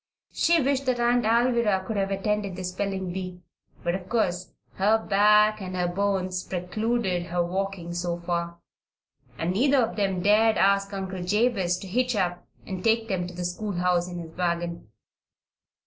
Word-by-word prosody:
She 335 Hz, 0 st, +3 dB
wished 275 Hz, -1 st, 0 dB
that 250 Hz, -1 st, +1 dB
Aunt 240 Hz, 0 st, +2 dB
Alvirah 230 Hz, -4 st, +2 dB
could 220 Hz, -, -3 dB
have 195 Hz, -1 st, 0 dB
attended 200 Hz, 0 st, -1 dB
the 185 Hz, -, -6 dB
spelling 190 Hz, 0 st, -3 dB
bee; 180 Hz, -1 st, -5 dB, 0.4 s
but 175 Hz, -, 0 dB
of 185 Hz, 0 st, -5 dB
course 185 Hz, -6 st, 0 dB, 0.3 s
her 210 Hz, +4 st, +4 dB
back 210 Hz, 0 st, +4 dB
and 185 Hz, -1 st, -5 dB
her 180 Hz, -1 st, 0 dB
bones 185 Hz, 0 st, -1 dB
precluded 185 Hz, 0 st, -1 dB
her 175 Hz, 0 st, 0 dB
walking 185 Hz, -1 st, -3 dB
so 175 Hz, 0 st, -2 dB
far, 170 Hz, 0 st, -3 dB, 0.8 s
and 170 Hz, +2 st, -1 dB
neither 270 Hz, +7 st, +3 dB
of 235 Hz, -3 st, +1 dB
them 195 Hz, -3 st, 0 dB
dared 215 Hz, +2 st, +4 dB
ask 195 Hz, 0 st, +3 dB
Uncle 190 Hz, -2 st, -4 dB
Jabez 195 Hz, -2 st, +1 dB
to 195 Hz, -, -9 dB
hitch 250 Hz, +5 st, 0 dB
up 180 Hz, -3 st, -1 dB, 0.2 s
and 185 Hz, -1 st, -5 dB
take 225 Hz, 0 st, +2 dB
them 180 Hz, -3 st, -1 dB
to 180 Hz, -, -10 dB
the 180 Hz, 0 st, -4 dB
schoolhouse 180 Hz, -2 st, 0 dB
in 175 Hz, -, -6 dB
his 165 Hz, -2 st, -8 dB
wagon. 170 Hz, -6 st, -2 dB
190 Hz, 165 wpm, -26 LUFS, 180-215 Hz, 0.8 s, her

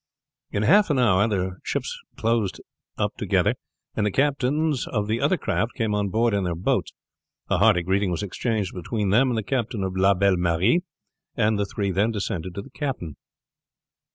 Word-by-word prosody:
In 100 Hz, -, -1 dB
half 205 Hz, -, +5 dB
an 145 Hz, -, +2 dB
hour 105 Hz, -4 st, +4 dB
the 95 Hz, -3 st, -2 dB
ships -, -, -2 dB, 0.2 s
closed 115 Hz, -3 st, 0 dB, 0.4 s
up -, -, -1 dB
together, -, -, +2 dB, 0.4 s
and 105 Hz, -, 0 dB
the 105 Hz, -, +2 dB
captains 140 Hz, +2 st, +1 dB
of 105 Hz, -3 st, -2 dB
the 110 Hz, +3 st, -1 dB
other 150 Hz, +6 st, +2 dB
crafts 115 Hz, -4 st, -1 dB
came 110 Hz, -4 st, -1 dB
on 105 Hz, -1 st, 0 dB
board 115 Hz, +3 st, +1 dB
in 100 Hz, -1 st, +1 dB
their 90 Hz, -2 st, -1 dB
boats. 85 Hz, -, 0 dB, 0.6 s
A -, -, +3 dB
hearty 90 Hz, -, +4 dB
greeting 95 Hz, +2 st, +1 dB
was 90 Hz, +3 st, -2 dB
exchanged 105 Hz, 0 st, -2 dB
between 100 Hz, +3 st, -2 dB
them 125 Hz, +6 st, +4 dB
and 120 Hz, -, -1 dB
the 110 Hz, -, -1 dB
captain 115 Hz, -3 st, -2 dB
of 95 Hz, -1 st, -3 dB
La 95 Hz, +1 st, +4 dB
Belle 100 Hz, 0 st, +3 dB
Marie, 90 Hz, -, +2 dB, 0.5 s
and 110 Hz, -2 st, +2 dB
the 100 Hz, -, 0 dB
three 100 Hz, 0 st, -2 dB
then 100 Hz, +5 st, +2 dB
descended 95 Hz, -5 st, -3 dB
to 100 Hz, -, -5 dB
the -, -, -15 dB
cabin. 130 Hz, -, -4 dB
105 Hz, 185 wpm, -24 LUFS, 95-120 Hz, 0.6 s, half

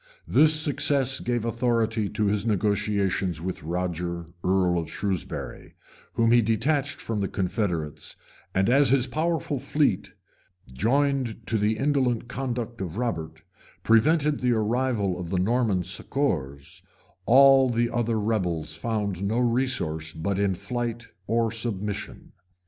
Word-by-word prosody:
[*] -, -, -37 dB
This 155 Hz, 0 st, +5 dB
success 140 Hz, -3 st, +2 dB
gave 120 Hz, -2 st, -2 dB
authority 115 Hz, -2 st, 0 dB
to 105 Hz, -, -1 dB
his 100 Hz, 0 st, +1 dB
negotiations 100 Hz, -4 st, 0 dB
with 90 Hz, +3 st, -5 dB
Roger, 85 Hz, 0 st, -3 dB, 0.2 s
earl 90 Hz, -2 st, +2 dB
of 80 Hz, -2 st, -5 dB
Shewsbury, 95 Hz, 0 st, -4 dB, 0.4 s
whom 115 Hz, 0 st, +2 dB
he 120 Hz, 0 st, +6 dB
detached 140 Hz, +6 st, 0 dB
from 110 Hz, -2 st, -3 dB
the 100 Hz, -, 0 dB
confederates; 90 Hz, -6 st, -3 dB, 0.4 s
and 95 Hz, +1 st, +2 dB
as 135 Hz, +2 st, +4 dB
his 130 Hz, -1 st, +3 dB
powerful 155 Hz, +1 st, -1 dB
fleet, 140 Hz, -5 st, 0 dB, 0.6 s
joined 125 Hz, -, 0 dB
to 110 Hz, -, -2 dB
the 110 Hz, +1 st, +1 dB
indolent 130 Hz, -4 st, 0 dB
conduct 120 Hz, -3 st, -4 dB
of 90 Hz, 0 st, -5 dB
Robert, 80 Hz, -9 st, -3 dB, 0.4 s
prevented 150 Hz, +6 st, +3 dB
the 125 Hz, -1 st, +2 dB
arrival 110 Hz, -4 st, 0 dB
of 85 Hz, -2 st, -5 dB
the 95 Hz, -, -1 dB
Norman 105 Hz, -1 st, +1 dB
succors, 85 Hz, -, -3 dB, 0.5 s
all 135 Hz, +1 st, +7 dB
the 120 Hz, 0 st, 0 dB
other 115 Hz, -2 st, 0 dB
rebels 90 Hz, -8 st, -1 dB
found 100 Hz, -1 st, -2 dB
no 105 Hz, +4 st, 0 dB
resource 115 Hz, -11 st, 0 dB
but 95 Hz, +5 st, -2 dB
in 100 Hz, -2 st, +1 dB
flight 120 Hz, +2 st, -4 dB, 0.2 s
or 115 Hz, 0 st, +1 dB
submission. 105 Hz, -3 st, -5 dB
110 Hz, 130 wpm, -25 LUFS, 95-125 Hz, 0.6 s, all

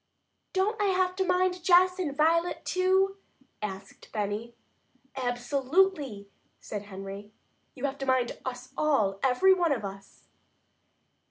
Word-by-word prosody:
"Don't 410 Hz, +3 st, 0 dB
I -, -, +3 dB
have 370 Hz, -1 st, +1 dB
to 380 Hz, -, +2 dB
mind 365 Hz, -1 st, +1 dB
Jess 365 Hz, +1 st, +5 dB
and 290 Hz, -6 st, -2 dB
Violet 335 Hz, +3 st, +2 dB
too?" 380 Hz, +1 st, +2 dB, 0.4 s
asked 195 Hz, -2 st, -7 dB
Benny. 215 Hz, +2 st, -3 dB, 0.6 s
"Absolutely!" 265 Hz, -, 0 dB, 0.3 s
said 205 Hz, -1 st, -6 dB
Henry. 195 Hz, +1 st, -8 dB, 0.4 s
"You 265 Hz, +1 st, -4 dB
have 280 Hz, 0 st, -3 dB
to 270 Hz, -, -4 dB
mind 255 Hz, -2 st, +1 dB
us 255 Hz, 0 st, -6 dB
all, 215 Hz, -11 st, +1 dB
every 270 Hz, +9 st, +5 dB
one 350 Hz, -4 st, +1 dB
of 230 Hz, -7 st, -1 dB
us!" 195 Hz, 0 st, -10 dB
280 Hz, 125 wpm, -28 LUFS, -, 0.6 s, Jess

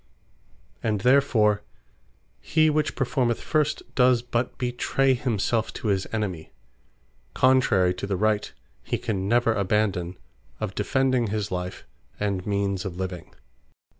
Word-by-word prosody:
And 105 Hz, -3 st, -1 dB
therefore 110 Hz, -5 st, +3 dB, 0.8 s
he 155 Hz, -, +2 dB
which 150 Hz, 0 st, 0 dB
performeth 125 Hz, -3 st, 0 dB
first, 155 Hz, -1 st, 0 dB
does 125 Hz, -2 st, +4 dB
but 120 Hz, 0 st, -2 dB
betray 130 Hz, +2 st, +1 dB
himselfe 115 Hz, -2 st, 0 dB
to 110 Hz, -, -3 dB
his 95 Hz, -1 st, 0 dB
enemy; 95 Hz, -8 st, -3 dB, 0.8 s
contrary 120 Hz, -9 st, +4 dB
to 90 Hz, +2 st, -5 dB
the 100 Hz, -2 st, -1 dB
Right 105 Hz, +1 st, +1 dB, 0.3 s
(he -, -, -2 dB
can 100 Hz, -5 st, -2 dB
never 120 Hz, +1 st, +3 dB
abandon) 95 Hz, -3 st, 0 dB, 0.4 s
of 110 Hz, -3 st, -3 dB
defending 130 Hz, +3 st, +1 dB
his 105 Hz, -1 st, -3 dB
life, 90 Hz, 0 st, -4 dB, 0.3 s
and 100 Hz, -2 st, -2 dB
means 100 Hz, -2 st, 0 dB
of 90 Hz, -2 st, -6 dB
living. 90 Hz, -2 st, -6 dB
110 Hz, 125 wpm, -25 LUFS, 95-125 Hz, 0.8 s, does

